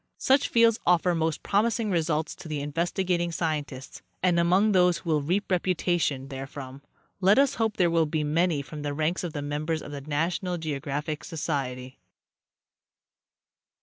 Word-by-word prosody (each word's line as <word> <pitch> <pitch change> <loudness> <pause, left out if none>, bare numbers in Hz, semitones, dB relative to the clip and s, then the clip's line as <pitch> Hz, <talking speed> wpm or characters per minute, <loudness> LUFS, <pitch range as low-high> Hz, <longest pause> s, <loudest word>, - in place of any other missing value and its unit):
Such 270 +2 +3
fields 230 -1 +4
offer 180 0 +4
most 160 -1 -1
promising 220 +1 +1
results 160 -2 0
to 160 - -10
investigating 170 +4 -1
sci 165 -1 0
entists, 135 -2 -10 0.2
and 175 -2 +3
among 185 +5 +3
those 180 -2 +4
who 170 - -4
will 150 -1 +2
reap 185 +8 -1
reputation 175 -6 0
therefrom 135 0 -8 0.4
let 195 +3 +4
us 275 0 +4
hope 220 -1 0
there 175 -3 +3
will 165 -1 +3
be 155 0 -1
many 155 0 +1
from 150 +1 -8
the 145 -1 -3
ranks 160 +5 -1
of 170 -3 -4
the 145 -2 -4
members 155 +2 -2
of - - -9
the 140 -1 -6
NATIONAL 170 +5 -1
GEOGRAPHIC 150 -1 -3
SOCIETY. 130 -5 -4
165 Hz, 155 wpm, -27 LUFS, 145-180 Hz, 0.4 s, fields